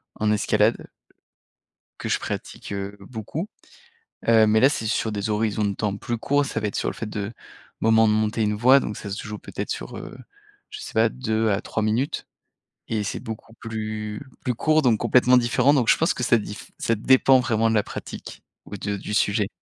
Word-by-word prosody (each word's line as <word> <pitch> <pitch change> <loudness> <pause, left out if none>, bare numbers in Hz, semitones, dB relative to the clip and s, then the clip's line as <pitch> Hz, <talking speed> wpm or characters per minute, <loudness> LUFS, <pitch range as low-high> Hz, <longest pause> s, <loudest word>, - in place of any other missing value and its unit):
en 110 0 +1
escalade 105 - +2 1.1
que - - -4
je - - +1
pratique, - - -6
heu, 100 +1 -4
beaucoup, 115 - -6 0.8
heu, 115 -1 +6
mais 110 +1 +4
là, 130 - +7
c'est 115 -6 -2
sur 110 0 0
des 105 +1 -2
horizons 105 0 0
de 100 -1 0
temps 100 0 -2
plus 120 +3 -3
courts. 145 +5 +1
Ça 115 - -3
va 105 - -1
être 100 - -5
sur - - 0
le - - -6
fait 110 - -5
de 105 0 -4 0.5
moment 110 0 +4
de - - +3
monter 110 +1 0
une 105 0 +1
voie, 130 +6 +6
donc 105 - -4
ça 100 - -7
se 100 - -5
joue 105 0 -5
peut-être - - -6
sur, - - -5
heu, - - -9 0.5
je 420 - -8
sais - - -8
pas 110 +1 +4
2 110 -3 -1
à 100 - 0
3 110 - -3
minutes 115 +6 -1 0.6
et 110 -2 -1
c'est 105 - -3
beaucoup 110 0 -8
plus 110 -1 -5 0.2
plus 125 - 0
court 155 +5 +3
donc 120 -6 +3
complètement 125 0 +5
différent, 125 +4 +3
donc 125 -6 +2
je - - +6
pense 165 - +2
que 125 - -4
ça 120 0 +4
diff 105 -1 -7
ça 115 - +1
dépend 130 +4 +5
vraiment 115 -2 +1
de - - +1
la 105 - +3
pratique - - -8 0.2
ou 105 - -7
de 100 +1 -3
du 105 - -6
sujet. 105 -1 +2
110 Hz, 210 wpm, -24 LUFS, 105-120 Hz, 1.1 s, là